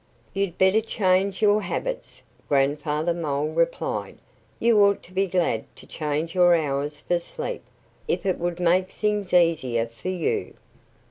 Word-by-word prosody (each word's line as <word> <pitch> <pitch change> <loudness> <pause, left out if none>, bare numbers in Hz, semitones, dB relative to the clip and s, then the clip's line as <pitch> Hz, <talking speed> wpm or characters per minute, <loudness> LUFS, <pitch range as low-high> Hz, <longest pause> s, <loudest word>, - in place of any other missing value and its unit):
"You'd 195 -3 -2
better 190 +4 +4
change 195 -2 +1
your 210 0 +4
habits," - - -4 0.3
Grandfather 150 +4 +1
Mole 150 -3 -2
replied. 170 +1 -1 0.4
"You 230 -2 +4
ought 200 0 +2
to 185 - -16
be 195 +1 +1
glad 170 -11 0
to - - -13
change 155 +1 -3
your 175 -2 +5
hours 145 -1 -2
for 175 -1 0
sleep, 480 - -5 0.5
if - - -1
it 185 - 0
would 175 0 -2
make 180 +2 +2
things 210 -3 -1
easier 155 -10 +3
for 115 +9 -7
you." 180 -3 -2
175 Hz, 145 wpm, -24 LUFS, 150-190 Hz, 0.5 s, your